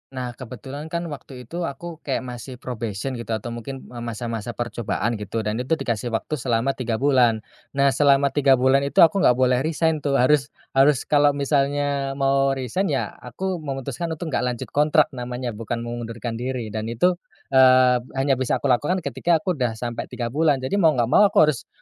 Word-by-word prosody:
Nah, 125 Hz, -1 st, -3 dB
kebetulan 130 Hz, +4 st, -8 dB
kan 170 Hz, +1 st, -3 dB
waktu 130 Hz, -3 st, -9 dB
itu, 170 Hz, +7 st, -4 dB
aku 165 Hz, +4 st, -7 dB
kayak 135 Hz, -3 st, -3 dB
masih 125 Hz, +1 st, -7 dB
probation 120 Hz, -1 st, -4 dB
gitu 115 Hz, -, -7 dB
atau 115 Hz, +2 st, -5 dB
mungkin 130 Hz, +3 st, -7 dB
masa-masa 115 Hz, -1 st, -5 dB
percobaan 120 Hz, -1 st, -2 dB
gitu 105 Hz, +2 st, -3 dB
dan 105 Hz, +2 st, -2 dB
itu 130 Hz, +6 st, 0 dB
dikasi 120 Hz, -6 st, -3 dB
waktu 120 Hz, +6 st, -3 dB
selama 120 Hz, +1 st, +1 dB
3 125 Hz, -4 st, -3 dB
bulan. 120 Hz, -4 st, +3 dB, 0.3 s
Nah, 140 Hz, 0 st, +4 dB
selama 140 Hz, 0 st, +3 dB
3 135 Hz, -2 st, +4 dB
bulan 135 Hz, +2 st, +3 dB
itu 140 Hz, -, +5 dB
aku 170 Hz, +5 st, +4 dB
enggak 125 Hz, -10 st, +5 dB
boleh 125 Hz, -1 st, +3 dB
resign 160 Hz, +2 st, 0 dB
tuh 140 Hz, -1 st, -1 dB
harus 135 Hz, +2 st, +3 dB, 0.2 s
harus 135 Hz, 0 st, +4 dB
kalau 145 Hz, -1 st, +3 dB
misalnya 140 Hz, -1 st, 0 dB
mau 135 Hz, 0 st, +2 dB
resign 135 Hz, -, -2 dB
ya -, -, -1 dB
aku 190 Hz, -2 st, -4 dB
memutuskan 140 Hz, +1 st, -4 dB
untuk 160 Hz, -1 st, -5 dB
enggak 125 Hz, -, 0 dB
lanjut 120 Hz, -2 st, -4 dB
kontrak 150 Hz, +1 st, +3 dB
namanya 125 Hz, -1 st, -4 dB
bukan 115 Hz, +2 st, -4 dB
mengundurkan 115 Hz, -1 st, -5 dB
diri 125 Hz, -3 st, -4 dB
dan 110 Hz, +1 st, -4 dB
itu, 175 Hz, +10 st, +1 dB, 0.3 s
eee, 130 Hz, -1 st, +6 dB, 0.2 s
hanya 135 Hz, -1 st, +1 dB
bisa 130 Hz, -, -1 dB
aku 140 Hz, -, +3 dB
lakukan 155 Hz, +8 st, +1 dB
ketika 170 Hz, +1 st, 0 dB
aku 180 Hz, -6 st, -1 dB
udah 120 Hz, -3 st, 0 dB
sampai 120 Hz, +1 st, -5 dB
3 120 Hz, -1 st, -4 dB
bulan 145 Hz, -3 st, +2 dB
jadi 200 Hz, +10 st, 0 dB
mau 160 Hz, -4 st, +4 dB
enggak 120 Hz, -2 st, +1 dB
mau 205 Hz, -, +7 dB
aku 155 Hz, -5 st, +4 dB
harus 135 Hz, -, -9 dB
130 Hz, 185 wpm, -23 LUFS, 120-145 Hz, 0.3 s, mau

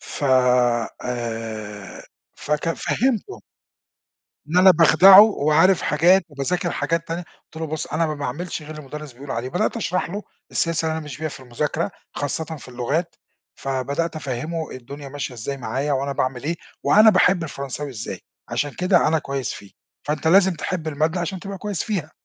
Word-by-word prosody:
ف 145 Hz, -, -6 dB, 0.8 s
آآ، 110 Hz, -4 st, -5 dB, 0.3 s
فكان 150 Hz, +2 st, -1 dB
فهّمته 265 Hz, -, -1 dB, 1.1 s
إن 165 Hz, -, -1 dB
أنا 185 Hz, +1 st, +8 dB
باخدعه 185 Hz, +3 st, +8 dB
وعارف 180 Hz, -3 st, +4 dB
حاجات 175 Hz, +5 st, +4 dB
وباذاكر 170 Hz, +5 st, -2 dB
حاجات 165 Hz, 0 st, -1 dB
تانية، 170 Hz, +2 st, -3 dB, 0.2 s
قُلت -, -, -20 dB
له: 160 Hz, 0 st, -3 dB
"بُصّ، 155 Hz, 0 st, -4 dB
أنا 165 Hz, +2 st, 0 dB
ما 155 Hz, -, -2 dB
باعملش 155 Hz, +5 st, -4 dB
غير 150 Hz, -, -10 dB
اللي 155 Hz, -1 st, -7 dB
المدرس 150 Hz, 0 st, -8 dB
بيقول 135 Hz, +3 st, -11 dB
عليه"، 115 Hz, +1 st, -2 dB
بدأت 195 Hz, -, -1 dB
أشرح 185 Hz, -6 st, -1 dB
له 205 Hz, +3 st, -4 dB, 0.3 s
السياسة 165 Hz, -1 st, 0 dB
اللي 160 Hz, -, 0 dB
أنا 160 Hz, -, -3 dB
ماشي 150 Hz, -4 st, -8 dB
بيها 155 Hz, 0 st, -2 dB
في 145 Hz, -, -10 dB
المذاكرة 150 Hz, +8 st, -2 dB, 0.2 s
خاصةً 145 Hz, +2 st, -2 dB
في 155 Hz, -4 st, -9 dB
اللغات، 140 Hz, +8 st, -2 dB, 0.4 s
فبدأت 140 Hz, +5 st, -2 dB
أفهّمه 155 Hz, +4 st, -4 dB
الدنيا 140 Hz, +3 st, -9 dB
ماشية 135 Hz, -2 st, -5 dB
إزاي 125 Hz, +4 st, -4 dB
معايا 135 Hz, +4 st, -2 dB
وأنا 140 Hz, +1 st, 0 dB
باعمل 130 Hz, -1 st, -2 dB
إيه، 165 Hz, +3 st, -1 dB, 0.3 s
وأنا 215 Hz, +2 st, +7 dB
باحب 185 Hz, -2 st, +3 dB
الفرنساوي 140 Hz, -1 st, -5 dB
إزاي، 115 Hz, -5 st, -6 dB, 0.3 s
عشان 145 Hz, +2 st, -1 dB
كده 180 Hz, +1 st, +2 dB
أنا 160 Hz, +1 st, +2 dB
كويس 140 Hz, -4 st, -3 dB
فيه، 100 Hz, -, -11 dB, 0.3 s
فأنت 150 Hz, +2 st, -1 dB
لازم 190 Hz, +2 st, +6 dB
تحب 165 Hz, 0 st, -3 dB
المادة 155 Hz, +4 st, 0 dB
عشان 180 Hz, +2 st, -3 dB
تبقى 195 Hz, +1 st, -7 dB
كويس 205 Hz, -3 st, -3 dB
فيها. 185 Hz, -9 st, -3 dB
155 Hz, 165 wpm, -22 LUFS, 140-175 Hz, 1.1 s, أنا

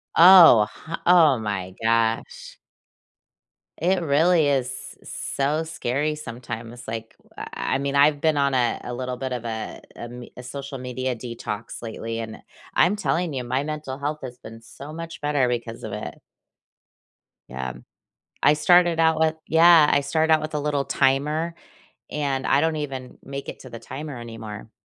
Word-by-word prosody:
Oh, 165 Hz, -, +9 dB
h 165 Hz, +1 st, -7 dB
oh 165 Hz, -7 st, +6 dB
my 95 Hz, -4 st, -4 dB
gosh! 115 Hz, 0 st, 0 dB, 1.2 s
It 180 Hz, +2 st, +1 dB
really 160 Hz, +1 st, +3 dB
is 135 Hz, -3 st, +1 dB, 0.3 s
s -, -, -11 dB, 0.3 s
so 145 Hz, +3 st, +1 dB
scary 150 Hz, -1 st, -2 dB
sometimes, 120 Hz, -3 st, -8 dB
like, 115 Hz, 0 st, -6 dB
w -, -, -29 dB
uh, -, -, -6 dB
uh, -, -, -5 dB
I 130 Hz, -, -1 dB
mean, 140 Hz, 0 st, -2 dB
I've 145 Hz, +1 st, +4 dB
been 155 Hz, 0 st, +2 dB
on 140 Hz, -1 st, +2 dB
a 120 Hz, -2 st, +1 dB
a 125 Hz, -, -6 dB
little 125 Hz, -1 st, -3 dB
bit 130 Hz, 0 st, -4 dB
of 120 Hz, -1 st, -5 dB
a 110 Hz, -1 st, -5 dB
a -, -, -14 dB
m 120 Hz, 0 st, -9 dB
a 125 Hz, -, -8 dB
social 135 Hz, +1 st, -7 dB
media 125 Hz, 0 st, -3 dB
detox 115 Hz, -1 st, -6 dB
lately, 115 Hz, 0 st, -5 dB
and 110 Hz, -1 st, -7 dB, 0.3 s
I'm 205 Hz, -, +4 dB
telling 175 Hz, -5 st, -1 dB
you, 125 Hz, -, -2 dB
my 130 Hz, +3 st, -1 dB
mental 150 Hz, -3 st, -5 dB
health 150 Hz, +2 st, -3 dB
has 125 Hz, -1 st, -8 dB
been 115 Hz, 0 st, -11 dB
so 140 Hz, +6 st, -11 dB
much 165 Hz, 0 st, -8 dB
better 145 Hz, -3 st, +1 dB
because 120 Hz, -1 st, -4 dB
of -, -, -5 dB
it. -, -, -6 dB, 1.3 s
Yeah, 65 Hz, 0 st, -4 dB
m -, -, -11 dB, 0.6 s
I 145 Hz, -, +6 dB
started 175 Hz, +2 st, +4 dB
out 160 Hz, -1 st, +3 dB
with 160 Hz, 0 st, +2 dB
Yeah, 165 Hz, -1 st, +6 dB
I 145 Hz, -, +4 dB
started 160 Hz, +3 st, +1 dB
out 155 Hz, -, +5 dB
with 155 Hz, 0 st, -5 dB
a 150 Hz, -, 0 dB
little 145 Hz, -2 st, 0 dB
timer, 150 Hz, +5 st, +1 dB, 0.6 s
and 140 Hz, -3 st, -2 dB
I 140 Hz, -, +4 dB
don't 160 Hz, -1 st, +1 dB
even 135 Hz, -4 st, -6 dB
make 140 Hz, 0 st, -7 dB
it -, -, -7 dB
to 130 Hz, -, -11 dB
the 115 Hz, -, -8 dB
timer 135 Hz, +2 st, -7 dB
anymore. 110 Hz, -2 st, -8 dB
140 Hz, 175 wpm, -24 LUFS, 120-155 Hz, 1.3 s, Oh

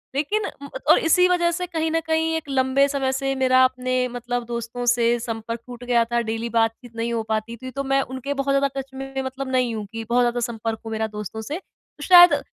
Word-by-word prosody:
लेकिन 410 Hz, +10 st, 0 dB, 0.2 s
उम, 280 Hz, -, -7 dB, 0.2 s
और -, -, +7 dB
इस -, -, -4 dB
इसी 360 Hz, +3 st, +5 dB
वजह 345 Hz, -1 st, +2 dB
से 360 Hz, +2 st, -2 dB
कहीं 320 Hz, -2 st, -1 dB
न 325 Hz, -, +2 dB
कहीं 320 Hz, 0 st, +1 dB
एक 320 Hz, -3 st, -4 dB
लंबे 265 Hz, +1 st, +3 dB
समय 275 Hz, -2 st, -1 dB
से 270 Hz, 0 st, -1 dB
मेरा 260 Hz, -1 st, +4 dB
अपने 255 Hz, 0 st, 0 dB
मतलब 245 Hz, 0 st, -4 dB
दोस्तों 235 Hz, +1 st, -4 dB
से 240 Hz, 0 st, +3 dB
संपर्क 230 Hz, 0 st, -4 dB
टूट 245 Hz, -1 st, -9 dB
गया 240 Hz, -1 st, +3 dB
था 240 Hz, +1 st, 0 dB
डेली 225 Hz, +1 st, -3 dB
बातचीत 230 Hz, +1 st, -1 dB
नहीं 230 Hz, +1 st, -2 dB
हो 230 Hz, -1 st, -1 dB
पाती 220 Hz, +1 st, -2 dB
थी, 255 Hz, +3 st, -8 dB
तो 275 Hz, +1 st, -3 dB
मैं 270 Hz, 0 st, +2 dB
उनके 260 Hz, +1 st, -4 dB
बहुत 275 Hz, 0 st, -1 dB
ज़्यादा 275 Hz, 0 st, +3 dB
टच 270 Hz, 0 st, -8 dB
में 270 Hz, 0 st, -5 dB
मतलब 265 Hz, 0 st, -5 dB
नहीं 250 Hz, -2 st, +1 dB
हूँ 215 Hz, -1 st, -4 dB
कि 225 Hz, 0 st, -5 dB
बहुत 245 Hz, +1 st, +3 dB
ज़्यादा 240 Hz, 0 st, 0 dB
संपर्क 225 Hz, -1 st, -4 dB
हूँ 225 Hz, -, -5 dB
मेरा 220 Hz, 0 st, -1 dB
दोस्तों 210 Hz, +1 st, -5 dB
से। 290 Hz, +9 st, -4 dB
तो 300 Hz, -5 st, -17 dB
शायद 355 Hz, 0 st, +8 dB
255 Hz, 235 wpm, -23 LUFS, 235-275 Hz, 0.2 s, शायद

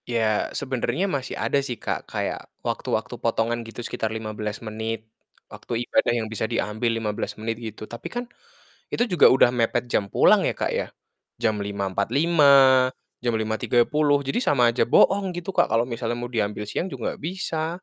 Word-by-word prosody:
Ya, 110 Hz, -3 st, +1 dB
sebenarnya 130 Hz, +6 st, -1 dB
masih 140 Hz, -9 st, -3 dB
ada 140 Hz, -, +1 dB
sih, 125 Hz, -4 st, -4 dB
Kak, -, -, -4 dB
kayak -, -, -4 dB, 0.2 s
waktu-waktu -, -, -2 dB
potongan, 115 Hz, +1 st, 0 dB
gitu, 115 Hz, +1 st, -8 dB
sekitar 110 Hz, -, -2 dB
15 110 Hz, -1 st, -4 dB
menit, 110 Hz, 0 st, -4 dB, 0.4 s
waktu 120 Hz, 0 st, -5 dB
ibadah -, -, +2 dB
yang 115 Hz, -, -1 dB
bisa 110 Hz, 0 st, -3 dB
diambil 110 Hz, +3 st, -1 dB
15 105 Hz, -2 st, -3 dB
menit, 115 Hz, +2 st, -4 dB
gitu. 110 Hz, -1 st, -7 dB
Tapi 120 Hz, +2 st, -8 dB
kan 245 Hz, 0 st, -3 dB, 0.7 s
itu -, -, +1 dB
juga 175 Hz, -4 st, +6 dB
udah 130 Hz, -, +5 dB
mepet 120 Hz, 0 st, 0 dB
jam 100 Hz, -, +1 dB
pulang -, -, +4 dB
ya, -, -, 0 dB
Kak, -, -, -2 dB
ya, -, -, -1 dB, 0.6 s
jam 110 Hz, -2 st, +1 dB
5.45, 100 Hz, -, +1 dB, 0.7 s
jam 120 Hz, -1 st, -1 dB
5.30, 120 Hz, +7 st, +2 dB
jadi 135 Hz, -, -1 dB
sama 140 Hz, -, +3 dB
aja 115 Hz, -, +1 dB
boong, 195 Hz, +7 st, +3 dB
gitu, 175 Hz, +2 st, -4 dB
Kak. -, -, +3 dB
Kalau 115 Hz, -, +2 dB
misalnya 120 Hz, 0 st, -2 dB
mau 120 Hz, 0 st, -5 dB
diambil 105 Hz, -2 st, -2 dB
siang -, -, -2 dB
juga 135 Hz, -10 st, -8 dB
nggak -, -, -9 dB
bisa, 170 Hz, -1 st, -3 dB
120 Hz, 170 wpm, -24 LUFS, 110-140 Hz, 0.7 s, juga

